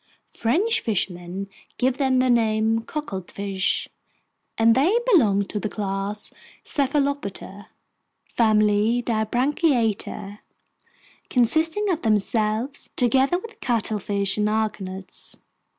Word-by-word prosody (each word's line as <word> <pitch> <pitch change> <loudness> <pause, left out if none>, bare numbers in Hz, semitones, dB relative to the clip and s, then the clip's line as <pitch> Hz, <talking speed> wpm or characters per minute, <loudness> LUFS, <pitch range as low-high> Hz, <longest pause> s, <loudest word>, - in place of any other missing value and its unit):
French 350 - +1
fishermen 185 -2 -3 0.3
give 260 +1 0
them 265 -2 +2
the 255 0 +3
name 225 -1 +2
"cuckoldfish," 195 - -3 0.7
and 225 0 +5
they 310 - +3 0.2
belong 205 - +4
to 210 - -4
the 215 - -3
class 200 0 -3 0.3
Cephalopoda, 275 -8 -2 0.6
family 215 +1 +2
Dibranchiata, 230 - 0 0.9
consisting 320 - +2
of 335 - -1
themselves 220 +4 0
together 265 +6 +3
with 455 +4 -10
cuttlefish 210 -4 -1
and 210 0 +2
argonauts. 195 -3 -4
225 Hz, 90 wpm, -23 LUFS, 205-265 Hz, 0.9 s, and